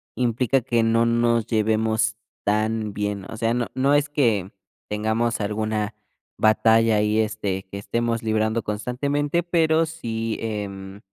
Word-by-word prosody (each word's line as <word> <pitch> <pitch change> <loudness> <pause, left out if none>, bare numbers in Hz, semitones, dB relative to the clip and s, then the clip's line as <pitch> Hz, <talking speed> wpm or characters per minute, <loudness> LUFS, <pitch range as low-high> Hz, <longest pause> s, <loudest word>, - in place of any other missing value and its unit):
implica 125 +2 +1
que 120 -2 +1
no 115 +1 +3
nos 115 -1 +2
llevemos 110 -1 +1 0.3
tan 110 0 0
bien. 105 -1 -3
O 110 - -7
sea, 115 +1 +1
no 120 -1 -1
no 135 +2 +2
es 145 0 +2
que 110 -10 +1 0.4
tengamos 110 +3 0
alguna 105 +1 -2 0.4
batalla 110 0 +4
ahí, 105 +1 +2
este, 100 -3 -1
que 100 - -5
estemos 115 +2 -1
librando 110 0 0
constantemente, 140 +9 -1
pero 165 -2 +2
sí, 115 -9 -4
em 100 -3 -5
110 Hz, 135 wpm, -23 LUFS, 105-120 Hz, 0.4 s, batalla